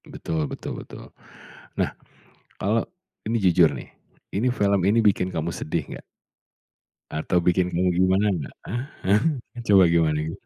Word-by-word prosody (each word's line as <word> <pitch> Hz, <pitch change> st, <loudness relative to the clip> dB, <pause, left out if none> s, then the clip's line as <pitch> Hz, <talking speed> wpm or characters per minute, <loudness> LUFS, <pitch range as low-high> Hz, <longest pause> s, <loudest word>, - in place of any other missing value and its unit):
E -, -, -17 dB
betul 80 Hz, -3 st, -3 dB
betul -, -, -6 dB
betul. -, -, -12 dB, 0.6 s
Nah, -, -, 0 dB, 0.7 s
kalau 110 Hz, +4 st, +1 dB, 0.4 s
ini 115 Hz, +2 st, +1 dB
jujur 90 Hz, -5 st, +4 dB
nih, 65 Hz, -, -8 dB, 0.4 s
ini 115 Hz, +6 st, +1 dB
film 100 Hz, -5 st, +1 dB
ini 100 Hz, +5 st, +3 dB
bikin 100 Hz, -4 st, +2 dB
kamu 85 Hz, -1 st, -2 dB
sedih, 80 Hz, -2 st, -3 dB
nggak? -, -, -9 dB, 1.1 s
Atau 80 Hz, +3 st, -1 dB
bikin 90 Hz, +1 st, +2 dB
kamu 90 Hz, +1 st, +2 dB
gimana 95 Hz, +2 st, +3 dB
nggak? 85 Hz, -7 st, -5 dB, 0.2 s
Ah 120 Hz, +3 st, -2 dB, 0.2 s
hah, 100 Hz, +3 st, +3 dB, 0.5 s
coba 100 Hz, -2 st, +7 dB
gimana 80 Hz, -2 st, +2 dB
gimana? 80 Hz, +1 st, -7 dB
95 Hz, 150 wpm, -24 LUFS, 80-100 Hz, 1.1 s, coba